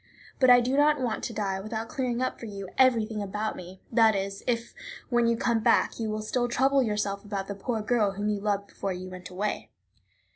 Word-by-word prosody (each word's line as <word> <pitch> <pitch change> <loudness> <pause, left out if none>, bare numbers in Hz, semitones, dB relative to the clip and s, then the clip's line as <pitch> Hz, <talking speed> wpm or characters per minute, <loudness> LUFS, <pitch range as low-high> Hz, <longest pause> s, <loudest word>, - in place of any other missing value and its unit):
But 260 -2 +5
I 245 0 +8
do 255 +3 0
not 295 0 +4
want 240 -4 -2
to - - -4
die 195 -3 -2
without 220 +3 -4
clearing 255 -5 -2
up 255 - -2
for 230 - -7
you 200 -2 -7
everything 230 -5 +3
about 210 +2 -3
me; 180 +1 -11
that 225 -2 +5
is, 195 0 -3
if, 235 -1 -1 0.4
when 240 -2 +3
you 230 0 +2
come 235 -1 +1
back, 220 - +2
you 225 -1 -2
will 215 0 -3
still 245 +3 0
trouble 270 +3 +3
yourself 210 -3 -1
about 200 -2 -4
the 200 - -3
poor 220 +2 -3
girl 215 -3 +2
whom 205 +2 -3
you 210 -1 0
loved 200 -1 -1
before 195 -1 -4
you 185 +1 -7
went 185 0 -9
away. 200 +3 -3
215 Hz, 220 wpm, -27 LUFS, 200-240 Hz, 0.4 s, I